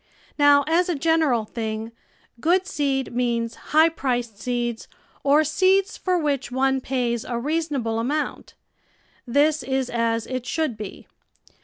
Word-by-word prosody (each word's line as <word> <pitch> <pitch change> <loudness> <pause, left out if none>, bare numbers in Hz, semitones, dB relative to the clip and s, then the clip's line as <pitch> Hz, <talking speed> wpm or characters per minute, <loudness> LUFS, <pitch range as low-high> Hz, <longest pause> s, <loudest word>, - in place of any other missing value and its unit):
Now, 290 -1 +5
as 345 +3 +2
a 345 - +1
general 300 -7 +2
thing, 220 0 -4 0.5
good 360 +8 +2
seed 275 -8 -1
means 235 -1 0 0.2
high 315 +2 +5
priced 245 -8 -3
seeds 240 -1 -3 0.4
or 290 +2 +4
seeds 375 +6 +2
for 365 -1 -1
M 335 -4 0
hich 280 -3 -1
one 265 +1 +1
pays 245 -3 -1
a 240 - -4
reason 310 +4 -1
able 225 -3 -1
amount. 290 +6 -3 0.7
This 290 +4 +3
is 265 0 -2
at 230 -1 0
it 255 -1 -5
should 315 -6 -1
be. 210 -2 -8
265 Hz, 145 wpm, -23 LUFS, 235-310 Hz, 0.7 s, Now